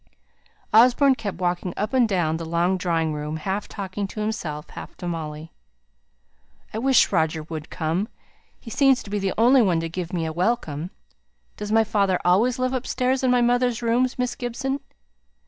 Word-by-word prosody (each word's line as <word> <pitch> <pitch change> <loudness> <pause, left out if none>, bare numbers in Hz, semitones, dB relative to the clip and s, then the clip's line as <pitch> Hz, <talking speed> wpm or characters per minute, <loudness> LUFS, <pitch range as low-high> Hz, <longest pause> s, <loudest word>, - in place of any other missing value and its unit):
Osborne 250 +5 +6
kept 225 -6 -5
walking 180 0 -2
up 210 +5 -2
and 250 -4 +3
down 165 -5 +1
the 165 - -6
long 170 +3 +1
drawing 165 -4 0
room, 150 +1 -4
half 190 +6 -3
talking 200 0 -4
to 215 - -8
himself, 170 -9 -3
half - - -10
to 175 - -6
Molly. 160 -1 -5 1.2
"I 220 - -2
wish 265 +1 +4
Roger 160 -3 +1
would 160 0 -7
come. 165 +6 -1 0.5
He 230 - -10
seems 270 -1 +3
to 200 - -11
be 205 - 0
the 195 -1 -1
only 245 +4 +6
one 180 -7 +2
to 165 0 -3
give 175 0 -5
me 170 -3 -1
a 160 - -3
welcome. 175 -4 -1 0.7
Does 210 0 -5
my 225 0 +5
father 200 -4 +1
always 220 +8 +3
live 255 0 0
upstairs 255 +1 0
in 260 - +3
my 250 -1 +4
mother's 245 -1 +1
rooms, 245 +2 +1
Miss 250 -1 -1
Gibson?" 265 +3 -3
200 Hz, 180 wpm, -24 LUFS, 165-245 Hz, 1.2 s, Osborne